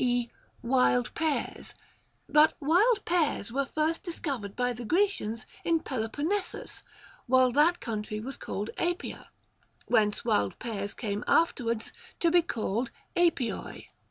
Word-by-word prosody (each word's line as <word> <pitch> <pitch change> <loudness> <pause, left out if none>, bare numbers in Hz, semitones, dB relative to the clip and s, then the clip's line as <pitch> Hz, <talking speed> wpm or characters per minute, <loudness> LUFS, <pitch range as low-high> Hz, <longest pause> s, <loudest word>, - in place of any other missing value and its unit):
e. 245 -1 +1 0.4
wild 245 0 +2
pears? 315 -3 -2 0.5
But 300 +1 +5
wild 395 - +3
pears 310 - +1
were 275 +2 0
first 310 +2 0
discovered 275 - -4
by 245 0 0
the 240 +1 -7
Grecians 315 - 0 0.2
in 330 -1 +2
Pelo 225 -4 -3
ponnesus, 365 - -3 0.5
while 255 0 +5
that 310 +7 +4
country 215 -2 -4
was 260 +4 -5
called 205 +3 -4
Apia, 350 +1 -3 0.6
whence 210 -1 +2
wild 100 -1 +1
pears 205 -3 -4
came 205 -3 -3
afterwards 235 -9 +1 0.3
to 335 - +3
be 350 0 +6
called 235 - -2 0.3
artioi. 335 -9 0
255 Hz, 130 wpm, -29 LUFS, 225-330 Hz, 0.6 s, be